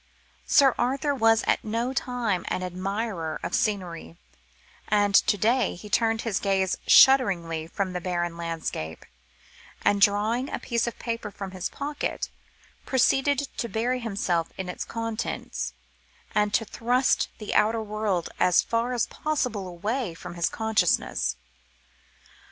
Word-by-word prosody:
Sir 275 Hz, -4 st, +6 dB
Arthur 270 Hz, +4 st, +1 dB
was 225 Hz, -4 st, +3 dB
at -, -, +1 dB
no 230 Hz, +4 st, -2 dB
time 245 Hz, -8 st, -1 dB
an 185 Hz, -, -2 dB
admirer 185 Hz, -2 st, -3 dB
of -, -, -4 dB
scenery, 175 Hz, -, -2 dB, 0.7 s
and 205 Hz, -1 st, +2 dB
to 205 Hz, -, +5 dB
day 230 Hz, +2 st, +2 dB
he 205 Hz, +4 st, -11 dB
turned 225 Hz, -1 st, +2 dB
his 225 Hz, -4 st, -1 dB
gaze 190 Hz, -2 st, +1 dB
shudderingly 170 Hz, -12 st, +5 dB
from 185 Hz, +2 st, -3 dB
the 180 Hz, -, -3 dB
barren 175 Hz, -1 st, -2 dB
landscape; 165 Hz, -, -5 dB, 0.8 s
and, 200 Hz, 0 st, +3 dB
drawing 215 Hz, +6 st, +3 dB
a -, -, -3 dB
paper 235 Hz, -2 st, -2 dB
from 195 Hz, -2 st, -7 dB
his 185 Hz, -1 st, -4 dB
pocket, 290 Hz, +1 st, -4 dB, 0.5 s
proceeded 275 Hz, +2 st, +2 dB
to 235 Hz, -, -2 dB
bury 240 Hz, +5 st, 0 dB
himself 195 Hz, -7 st, -1 dB
in 185 Hz, -1 st, -4 dB
its 180 Hz, -, -4 dB
contents, 225 Hz, -1 st, -4 dB, 0.6 s
and 210 Hz, -1 st, +2 dB
to 225 Hz, -, +1 dB
thrust 245 Hz, +4 st, +1 dB
the 210 Hz, -, -5 dB
outer 220 Hz, +1 st, +3 dB
world 210 Hz, -5 st, -1 dB
as 180 Hz, -1 st, +4 dB
far 230 Hz, +2 st, -1 dB
as 240 Hz, -, +1 dB
possible 250 Hz, -10 st, -2 dB
away 205 Hz, +3 st, -3 dB
from 165 Hz, -, -8 dB
his 170 Hz, 0 st, 0 dB
consciousness. 220 Hz, -, +1 dB
215 Hz, 135 wpm, -26 LUFS, 185-235 Hz, 0.8 s, Sir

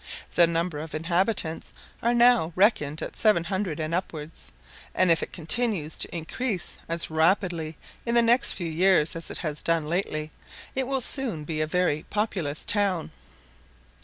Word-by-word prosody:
The 170 Hz, -1 st, +5 dB
number 165 Hz, -1 st, -2 dB
of 155 Hz, 0 st, -6 dB
inhabitants 170 Hz, +1 st, 0 dB, 0.3 s
are 235 Hz, +1 st, +1 dB
now 240 Hz, -8 st, +4 dB
reckoned 160 Hz, -7 st, +2 dB
at -, -, -7 dB
seven 210 Hz, -6 st, +4 dB
hundred 185 Hz, -3 st, -3 dB
and 155 Hz, +1 st, -3 dB
upwards, 155 Hz, -, -5 dB, 0.4 s
and 185 Hz, -2 st, +4 dB
if 165 Hz, -, +3 dB
it -, -, -5 dB
continues 175 Hz, -2 st, 0 dB
to -, -, +2 dB
increase 190 Hz, +4 st, -3 dB
as 165 Hz, -1 st, -3 dB
rapidly 165 Hz, -1 st, +1 dB, 0.3 s
in 235 Hz, 0 st, -1 dB
the 235 Hz, -, +5 dB
next 240 Hz, +3 st, +4 dB
few 175 Hz, -, -5 dB
years 165 Hz, -1 st, +3 dB
as 165 Hz, -, -6 dB
it -, -, -4 dB
has 150 Hz, -3 st, -3 dB
done 165 Hz, -2 st, 0 dB
lately, 155 Hz, -2 st, -2 dB, 0.4 s
it 265 Hz, -1 st, -1 dB
will 270 Hz, -1 st, 0 dB
soon 235 Hz, -, -2 dB
be 155 Hz, 0 st, -3 dB
a 155 Hz, -, 0 dB
very 170 Hz, -3 st, 0 dB
populous 185 Hz, -9 st, -2 dB
town*. 200 Hz, -5 st, +2 dB
170 Hz, 160 wpm, -26 LUFS, 160-205 Hz, 0.4 s, The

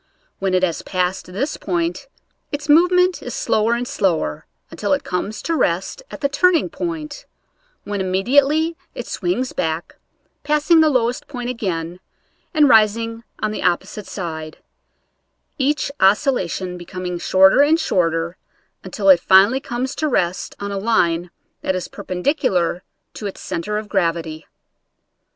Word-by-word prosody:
When 190 Hz, -1 st, 0 dB
it 185 Hz, -, +2 dB
has 170 Hz, -3 st, 0 dB
passed 185 Hz, 0 st, -2 dB
this 240 Hz, +12 st, -3 dB
point 175 Hz, +4 st, -2 dB, 0.4 s
its 290 Hz, 0 st, -4 dB
movement 360 Hz, +4 st, +4 dB
is -, -, -6 dB
slower 230 Hz, -, +1 dB
and 245 Hz, +1 st, -3 dB
slower, 185 Hz, -, -1 dB, 0.2 s
until -, -, -1 dB
it -, -, 0 dB
comes 200 Hz, +4 st, -3 dB
to 335 Hz, -, 0 dB
rest 185 Hz, -, 0 dB
at -, -, -9 dB
the 280 Hz, -, +3 dB
turning 335 Hz, +5 st, +2 dB
point, 315 Hz, -4 st, -5 dB, 0.6 s
when 205 Hz, -1 st, -3 dB
immediately 280 Hz, -, +2 dB, 0.2 s
it -, -, -5 dB
swings 260 Hz, -8 st, -2 dB
back, 160 Hz, +1 st, -3 dB, 0.4 s
passing 300 Hz, +2 st, +3 dB
the 310 Hz, -, +5 dB
lowest 245 Hz, -3 st, 0 dB
point 250 Hz, -3 st, -4 dB
again 175 Hz, -7 st, -4 dB, 0.5 s
and 305 Hz, -4 st, +4 dB
ris 215 Hz, -3 st, +6 dB
ing 230 Hz, 0 st, -5 dB, 0.2 s
on 215 Hz, -, 0 dB
the 215 Hz, -, -4 dB
opposite 190 Hz, +3 st, -1 dB
side; 160 Hz, -4 st, -6 dB, 1.0 s
each 280 Hz, +1 st, 0 dB
oscillation 190 Hz, -, +1 dB
be 175 Hz, -, -9 dB
coming 180 Hz, -1 st, -5 dB
shorter 190 Hz, +7 st, +5 dB
and 310 Hz, +3 st, +4 dB
shorter, 170 Hz, -, 0 dB, 0.5 s
until 200 Hz, -2 st, -3 dB
it 185 Hz, -3 st, +8 dB
finally 195 Hz, +9 st, +5 dB
comes 260 Hz, -1 st, -3 dB
to 310 Hz, -, 0 dB
rest 180 Hz, -, -1 dB
on 200 Hz, 0 st, -4 dB
a 200 Hz, -, -2 dB
line 175 Hz, -6 st, +1 dB, 0.3 s
that 190 Hz, -, -1 dB
is 185 Hz, -, -3 dB
perpendicular 180 Hz, -, -1 dB, 0.3 s
to 210 Hz, -, -5 dB
its 195 Hz, -, -8 dB
center 210 Hz, +5 st, -3 dB
of 215 Hz, 0 st, -5 dB
gravity. 165 Hz, -5 st, -1 dB
205 Hz, 145 wpm, -20 LUFS, 180-280 Hz, 1.0 s, it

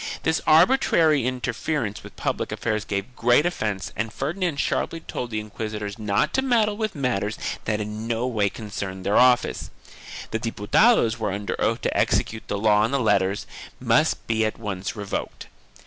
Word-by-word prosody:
This 160 Hz, 0 st, +1 dB
arbitrary 160 Hz, -, +4 dB
interference 125 Hz, -2 st, -2 dB
with -, -, -12 dB
public -, -, -2 dB
affairs 110 Hz, -2 st, -2 dB
gave 100 Hz, +5 st, -4 dB
great 120 Hz, +6 st, +4 dB
offence 110 Hz, -, -2 dB
and 110 Hz, 0 st, -2 dB
Ferdinand 160 Hz, -, -2 dB
sharply 165 Hz, -, -1 dB
told 125 Hz, -5 st, -5 dB
the 110 Hz, -2 st, -2 dB
inquisitors 105 Hz, -1 st, -5 dB
not 105 Hz, -2 st, 0 dB
to 265 Hz, -, +2 dB
meddle 230 Hz, -5 st, +2 dB
with 215 Hz, -2 st, -3 dB
matters 115 Hz, -7 st, -1 dB, 0.3 s
that 110 Hz, -1 st, 0 dB
in 105 Hz, +1 st, -5 dB
no 115 Hz, +1 st, -1 dB
way 110 Hz, -5 st, +1 dB
concerned 95 Hz, -3 st, -6 dB
their 100 Hz, -, +2 dB
office; 125 Hz, -1 st, +3 dB, 0.6 s
the 110 Hz, -, -1 dB
Diputados 115 Hz, -, +3 dB
were 110 Hz, -3 st, -1 dB
under 100 Hz, +1 st, -3 dB
oath -, -, +1 dB
to -, -, -1 dB
execute 110 Hz, 0 st, 0 dB
the 100 Hz, -, -2 dB
law 105 Hz, 0 st, +4 dB
and 110 Hz, -, 0 dB
the 140 Hz, -, +1 dB
letters 100 Hz, -4 st, +1 dB, 0.3 s
must -, -, +2 dB
be 110 Hz, -1 st, +1 dB
at 110 Hz, -, -1 dB
once 100 Hz, -3 st, -4 dB
revoked. 100 Hz, -2 st, -5 dB
110 Hz, 165 wpm, -24 LUFS, 105-140 Hz, 0.6 s, arbitrary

